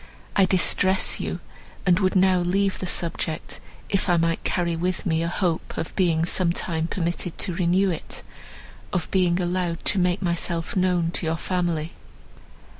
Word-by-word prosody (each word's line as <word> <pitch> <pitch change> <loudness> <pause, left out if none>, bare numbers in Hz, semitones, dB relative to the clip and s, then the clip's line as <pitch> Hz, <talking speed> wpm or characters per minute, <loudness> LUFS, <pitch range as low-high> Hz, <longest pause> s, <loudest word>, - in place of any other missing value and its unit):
I 195 - +5
distress 190 +1 +3
you, - - -4 0.4
and 180 -1 +4
would 185 -1 +1
now 185 -1 +4
leave 190 +2 0
the 185 - -4
subject, 165 -2 -2 0.3
if 195 -1 0
I 175 - +4
might 165 0 0
carry 170 -2 0
with 180 +2 -2
me 160 -3 +1
a 165 - 0
hope 175 -1 -2
of 160 - -4
being 165 -3 +2
some 180 0 +2
time 165 -2 -2
permitted 175 -1 -3
to 180 - 0
renew 185 +2 +2
it, 165 - -6 0.7
of 180 -3 -2
being 180 -2 +2
allowed 175 -1 -2
to 195 - +3
make 180 +2 +1
myself 170 -1 -1
known 180 -3 +1
to 170 - -1
your 160 +1 0
family." 170 -3 -2
175 Hz, 165 wpm, -24 LUFS, 170-185 Hz, 0.7 s, I